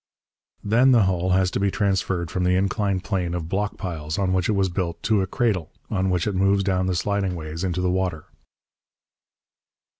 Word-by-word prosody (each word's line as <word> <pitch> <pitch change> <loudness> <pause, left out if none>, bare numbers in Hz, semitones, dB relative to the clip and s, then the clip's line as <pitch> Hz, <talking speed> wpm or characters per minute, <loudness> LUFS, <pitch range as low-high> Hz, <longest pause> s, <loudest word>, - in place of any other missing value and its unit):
Then 120 +5 +4
the 115 -4 +5
hull 95 -1 0
has 95 0 +2
to - - -1
be 100 0 +2
transferred 95 -4 -1
from 90 - -1
the 90 0 +3
inclined 100 0 0
plane 90 -3 -2
of 85 -2 -4
block 100 +4 -2
piles, 80 -4 -4
on 95 -2 +1
which 95 +1 +1
it - - +3
was 100 -1 +2
built, 85 -2 -3
to 110 -3 +2
a 95 - -1
cradle, 100 -7 -1 0.2
on 95 -2 0
which 90 -2 0
it 105 - -1
moves 100 +1 +2
down 95 -1 0
the 95 - 0
sliding 100 0 -1
ways 80 +1 -6
into 90 -1 -1
the 90 0 +1
water. 90 -4 -2
95 Hz, 200 wpm, -23 LUFS, 90-100 Hz, 0.2 s, the